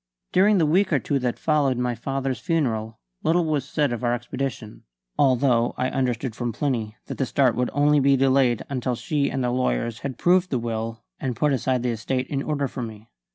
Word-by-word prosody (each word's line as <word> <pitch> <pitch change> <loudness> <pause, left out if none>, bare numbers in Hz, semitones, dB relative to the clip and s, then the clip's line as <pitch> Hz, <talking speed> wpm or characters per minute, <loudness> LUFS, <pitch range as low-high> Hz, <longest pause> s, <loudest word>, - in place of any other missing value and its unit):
During 200 +3 +4
the 165 - +3
week 185 +5 +2
or 150 - +4
two 140 +2 -1
that 125 -2 -1
followed 145 -5 +1
my 125 0 0
father's 135 +2 -3
funeral 115 - -1 0.2
little 170 +1 +2
was 150 -3 -1
said 145 -5 +1
of 120 - -5
our 120 0 +2
expedition, 120 -2 -5 0.3
although 125 -3 +3
I 130 0 0
understood 125 -2 -1
from 120 -1 -2
Plinny 115 -4 -2
that - - -7
the 135 - +2
start 130 -3 +3
would 125 -1 0
only 145 +1 +3
be 140 0 +4
delayed 130 -3 +3
until 130 -2 -2
she 140 +4 -1
and 135 - -2
the 125 - 0
lawyers 115 - -1
had 130 -3 -5
proved 180 +1 +3
the 130 - 0
will 115 -1 -4 0.2
and 130 -3 -2
put 150 +3 +1
his 135 -2 -2
estate 125 0 0
in 140 -2 -1
order 145 -1 -1
for 125 - -6
me. 110 -2 -8
130 Hz, 200 wpm, -24 LUFS, 120-145 Hz, 0.3 s, During